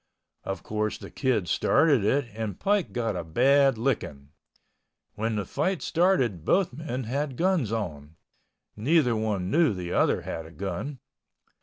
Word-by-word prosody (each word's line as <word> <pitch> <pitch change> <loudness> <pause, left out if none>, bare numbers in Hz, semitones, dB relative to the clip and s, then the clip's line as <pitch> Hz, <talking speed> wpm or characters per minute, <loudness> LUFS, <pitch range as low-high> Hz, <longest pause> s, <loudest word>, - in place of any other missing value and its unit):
Of 95 -3 -5
course 110 0 -2
the - - -11
Kid 120 -9 0
started 140 - +3
it 135 +7 +2
and 110 -3 -4
Pike 205 -2 +1
got 115 -4 -2
a 90 - -3
bad 135 - +3
licking. 105 - -2 0.8
When 110 +1 -2
the 105 -2 -2
fight 185 - -1
started 135 - +1
both 185 - +2
men 130 -3 -4
had 135 +3 -3
guns 175 - +1
on. 80 -9 -4 0.6
Neither 125 +1 +2
one 105 -4 -1
knew 155 -9 +3
the 90 -1 -4
other - - +2
had 80 -1 -5
a - - -13
gun. 100 - -5
115 Hz, 150 wpm, -27 LUFS, 95-145 Hz, 0.8 s, started